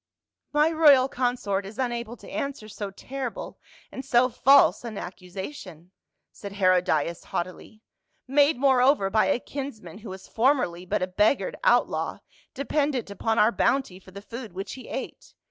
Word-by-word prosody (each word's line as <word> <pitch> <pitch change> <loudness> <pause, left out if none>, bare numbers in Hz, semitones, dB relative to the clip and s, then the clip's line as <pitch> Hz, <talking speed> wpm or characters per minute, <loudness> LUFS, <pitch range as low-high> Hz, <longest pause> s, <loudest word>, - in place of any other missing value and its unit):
" - - -65
My 300 +2 +3
royal 290 -5 +6
consort 245 -7 -1
is 200 +3 -10
unable 240 -2 -3
to - - -14
answer 275 -6 -4
so 205 -1 -6
terrible 255 +5 -6 0.3
and 265 - -7
so 255 -1 +3
false 275 +2 +5
an 225 -4 -6
accusation," 180 - -8 0.4
said 200 -1 -9
Herodias 180 -4 +1
haughtily. 185 +5 -6 0.2
" 310 -2 -47
Made 285 +1 +3
moreover 260 -5 +3
by 215 +1 +3
a - - +2
kinsman 235 - -7
who 220 - -10
was 190 0 -9
formerly 225 -8 +1
but - - 0
a - - -1
beggared 210 - +1
outlaw, - - +2 0.4
dependent 280 -4 -1
upon 225 +3 -1
our 220 0 +5
bounty 245 -8 0
for 190 - -17
the 200 +2 -11
food 230 -3 -8
which 195 +2 -6
he 260 - -10
ate. - - -7
230 Hz, 160 wpm, -26 LUFS, 195-270 Hz, 0.4 s, royal